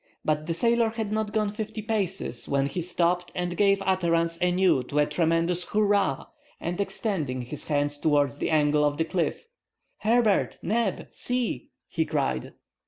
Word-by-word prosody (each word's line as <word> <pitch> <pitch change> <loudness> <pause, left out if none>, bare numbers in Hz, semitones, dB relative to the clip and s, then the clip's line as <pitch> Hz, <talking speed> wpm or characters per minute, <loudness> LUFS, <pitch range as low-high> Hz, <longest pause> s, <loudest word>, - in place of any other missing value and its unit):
But 155 0 0
the 165 - -1
sailor 235 +3 +3
had 220 -2 -4
not 215 -1 -1
gone 215 -1 +1
fifty 215 0 -5
paces 195 - -2
when 140 -1 +2
he 160 +6 -2
stopped 175 +1 0
and 180 0 -2
gave 195 0 +3
utterance 170 -3 +1
anew 180 -5 +3
to 145 - -4
a 150 - +5
tremendous 165 +3 +1
hurrah, 205 -9 +1 0.3
and 175 +3 -2
extending 155 - -2
his 140 +5 -7
hand 145 -1 +1
towards 145 -1 +1
the - - -1
angle 150 -1 +3
of 145 0 +1
the 160 - +1
cliff— 180 - -2 0.5
"Herbert! 220 -2 +2
Neb! 220 -1 -1
See!" 245 - -2 0.2
he - - 0
cried. 65 -1 -1
175 Hz, 160 wpm, -26 LUFS, 150-210 Hz, 0.5 s, a